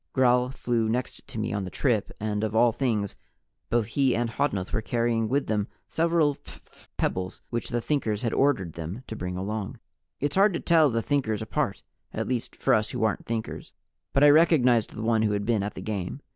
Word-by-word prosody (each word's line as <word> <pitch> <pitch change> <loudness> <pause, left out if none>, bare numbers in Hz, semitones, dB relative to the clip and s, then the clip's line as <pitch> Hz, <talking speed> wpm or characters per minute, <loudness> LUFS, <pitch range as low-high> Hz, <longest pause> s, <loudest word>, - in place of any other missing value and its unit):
Gral 125 -1 +3
flew 120 -4 -1
next 125 +3 -3
to 130 -4 -8
me 110 +2 -2
on 100 - -1
the 95 - -4
trip, 115 -1 0
and 105 0 -2
of 110 0 -2
all 120 +1 +5
things, 110 -5 -1 0.5
both 120 -2 +2
he 130 +3 +1
and 120 0 -1
Hodnuth 105 -8 -1
were 110 - +1
carrying 115 -1 0
with 140 +3 +1
them 105 -1 0 0.2
several 165 -3 +2
phph - - -16
pebbles 95 0 -2
which 120 -1 -3
the 120 - -1
Thinkers 115 -6 -1
had 115 - 0
ordered 100 - +1
them 85 +9 -6
to 110 - -6
bring 90 -3 -4
along. 100 +1 -4 0.4
It's 145 +4 -1
hard 200 -1 +5
to - - -1
tell 160 -3 +4
the 115 -2 -1
Thinkers 110 -7 0
apart 110 - -2 0.3
at - - -2
least 125 -3 -3
for 135 - +2
us 110 -2 +2
who 125 -2 -3
aren't 110 -2 0
Thinkers 115 -1 -4 0.4
but 135 - +3
I 145 - +9
recognized 135 -8 +4
the 110 - -5
one 110 -1 +2
who 105 -1 +2
had 100 0 -1
been 115 -2 +1
at 105 +1 -4
the - - -6
game. 105 +4 -4
115 Hz, 210 wpm, -26 LUFS, 105-135 Hz, 0.5 s, I